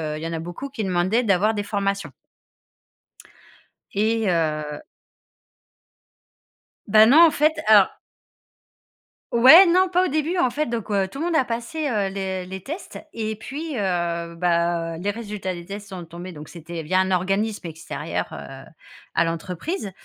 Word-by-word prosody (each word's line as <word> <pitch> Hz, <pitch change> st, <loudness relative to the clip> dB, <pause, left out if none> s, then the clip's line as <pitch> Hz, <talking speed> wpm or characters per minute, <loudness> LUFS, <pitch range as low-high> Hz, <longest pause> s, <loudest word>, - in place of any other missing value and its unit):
heu, -, -, -5 dB
il 155 Hz, -, -8 dB
y -, -, -2 dB
en 165 Hz, -, -5 dB
a 165 Hz, -, -3 dB
beaucoup 175 Hz, +12 st, -7 dB
qui 235 Hz, -6 st, -4 dB
demandaient 185 Hz, +6 st, +1 dB
d'avoir 205 Hz, +1 st, +2 dB
des 205 Hz, -, -2 dB
formations 200 Hz, -5 st, -2 dB, 1.8 s
et 220 Hz, +2 st, +1 dB
heu 155 Hz, -3 st, -1 dB, 2.1 s
Ben, 215 Hz, +2 st, +7 dB
non, 320 Hz, +5 st, +8 dB
en 315 Hz, -, +1 dB
fait, 305 Hz, +1 st, +2 dB
alors 205 Hz, -3 st, +7 dB, 1.4 s
Ouais, 265 Hz, +11 st, +9 dB
non, 365 Hz, +2 st, +3 dB
pas 365 Hz, +1 st, +3 dB
au -, -, 0 dB
début, 310 Hz, +4 st, -1 dB
en 260 Hz, -, +3 dB
fait, 295 Hz, +4 st, -2 dB
donc, 230 Hz, -3 st, -4 dB
heu, 200 Hz, -2 st, +1 dB
tout 275 Hz, -, -8 dB
le 320 Hz, -, -1 dB
monde 345 Hz, -1 st, 0 dB
a 290 Hz, -, +4 dB
passé, 240 Hz, +7 st, -5 dB
heu, 210 Hz, -5 st, 0 dB
le 190 Hz, -2 st, -3 dB
les 190 Hz, 0 st, -8 dB
tests 315 Hz, -, -7 dB
et 220 Hz, -1 st, -3 dB
puis, 290 Hz, +7 st, -6 dB
heu, 170 Hz, -4 st, -2 dB
bah, 170 Hz, -1 st, 0 dB
les 200 Hz, +3 st, -1 dB
résultats 205 Hz, -3 st, -5 dB
des 175 Hz, -1 st, -9 dB
tests 200 Hz, +2 st, -8 dB
sont 180 Hz, -3 st, -7 dB
tombés 175 Hz, +2 st, -9 dB
donc 150 Hz, -2 st, -10 dB
c'était 170 Hz, 0 st, -8 dB
via 185 Hz, +4 st, +1 dB
un 190 Hz, -, -1 dB
organisme 195 Hz, +2 st, -1 dB
extérieur, 160 Hz, 0 st, -5 dB
heu, 135 Hz, 0 st, -9 dB, 0.5 s
à -, -, +3 dB
l'entreprise 180 Hz, -, -4 dB
200 Hz, 165 wpm, -23 LUFS, 175-235 Hz, 2.1 s, Ouais